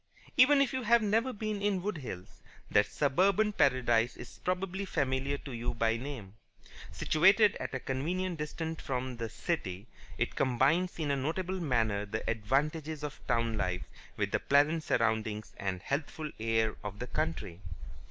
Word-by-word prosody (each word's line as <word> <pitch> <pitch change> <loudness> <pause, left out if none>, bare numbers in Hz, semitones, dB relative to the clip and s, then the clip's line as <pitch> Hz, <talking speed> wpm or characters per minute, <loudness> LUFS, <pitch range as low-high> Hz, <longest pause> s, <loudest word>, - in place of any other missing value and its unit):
Even 275 +1 +7
if 270 - -3
you 260 - -1
have 235 0 +4
never 225 +5 +2
been 215 -2 -3
in 200 -3 0
Wood 200 -5 -2
Hills, 95 -9 -8 0.3
that 105 0 +4
suburban 195 +9 +2
paradise 120 - +2
is 120 - -11
probably 185 +1 -1
familiar 135 -5 0
to 140 - -9
you 120 0 -3
by 115 -1 +2
name. 115 -6 -6 0.6
Situated 195 +6 +4
at - - -4
a - - -1
convenient 170 +7 -2
distance 160 +1 -4
from 130 -1 -3
the 115 -1 -3
city, 105 - -3 0.3
it - - -1
combines 140 +8 +2
in 155 -4 -1
a - - +2
notable 175 +7 -2
manner 110 - 0
the - - -4
advantages 150 +7 -1
of 145 -1 -5
town 115 -1 +1
life 90 0 -1 0.3
with - - -1
the - - +2
pleasant 145 +3 +3
surroundings 110 -6 0
and 95 -1 -3
healthful 150 +2 -3
air 110 0 +1
of 105 -1 -5
the 125 - -4
country. 125 - -3
140 Hz, 160 wpm, -31 LUFS, 115-180 Hz, 0.6 s, Even